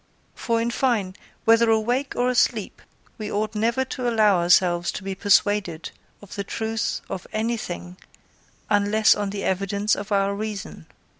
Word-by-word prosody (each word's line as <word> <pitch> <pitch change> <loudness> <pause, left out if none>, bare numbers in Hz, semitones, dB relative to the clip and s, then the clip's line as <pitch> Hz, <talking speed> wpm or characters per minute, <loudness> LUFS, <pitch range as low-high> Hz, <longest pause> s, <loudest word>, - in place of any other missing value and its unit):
For, 230 -1 -1
in 230 +1 -1
fine, 225 -8 0 0.3
whether 230 0 +5
awake 240 +5 0
or 245 - +1
asleep, 250 -1 0 0.4
we 215 0 -5
ought 215 +2 -1
never 230 +4 0
to 250 -1 -3
allow 215 -5 +3
ourselves 175 0 +3
to 190 - -6
be 195 0 -3
persuaded 200 -4 +1 0.3
of 205 - -12
the 200 - -3
truth 220 +2 -3
of 185 - -6
anything 215 -5 -4 0.7
unless 205 +1 +4
on 205 -1 -3
the 200 0 -5
evidence 200 +2 0
of 205 +1 -7
our 200 0 +2
reason. 210 0 -6
210 Hz, 150 wpm, -23 LUFS, 195-225 Hz, 0.7 s, whether